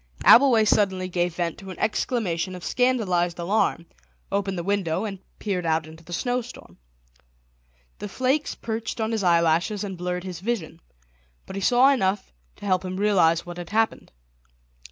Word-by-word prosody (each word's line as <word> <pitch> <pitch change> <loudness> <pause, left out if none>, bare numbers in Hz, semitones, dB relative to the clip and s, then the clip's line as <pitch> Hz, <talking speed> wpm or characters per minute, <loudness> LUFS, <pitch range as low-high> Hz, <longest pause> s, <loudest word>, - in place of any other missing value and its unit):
Abbleway 235 -3 +7
suddenly 190 -3 +2
gave 175 -1 -1
vent 170 -2 -2
to 195 - -10
an 185 - -8
exclamation 185 -7 -1
of 180 - -10
scandalised 195 -9 +1
alarm, 175 -1 0 0.5
opened 195 -1 -1
the 170 - -3
window, 195 -1 -1
and 195 -3 -5 0.2
peered 195 -4 -2
out 160 -1 0
into 160 +1 -13
the 175 - -13
snowstorm. 245 - -4 1.2
The 205 - -6
flakes 260 +7 0
perched 225 +1 -4
on 220 0 -1
his 220 -2 -1
eyelashes 170 +3 +2
and 195 -2 -5
blurred 180 0 -3
his 185 -3 -6
vision, 205 -4 -4 0.6
but - - -9
he 195 - -3
saw 250 +6 +5
enough 195 - 0 0.2
to - - -11
help 185 -2 +1
him 185 0 -4
to 190 - -4
realise 170 -5 +3
what 175 0 -8
had 175 -1 -7
happened. 220 +1 0
190 Hz, 165 wpm, -24 LUFS, 175-220 Hz, 1.2 s, Abbleway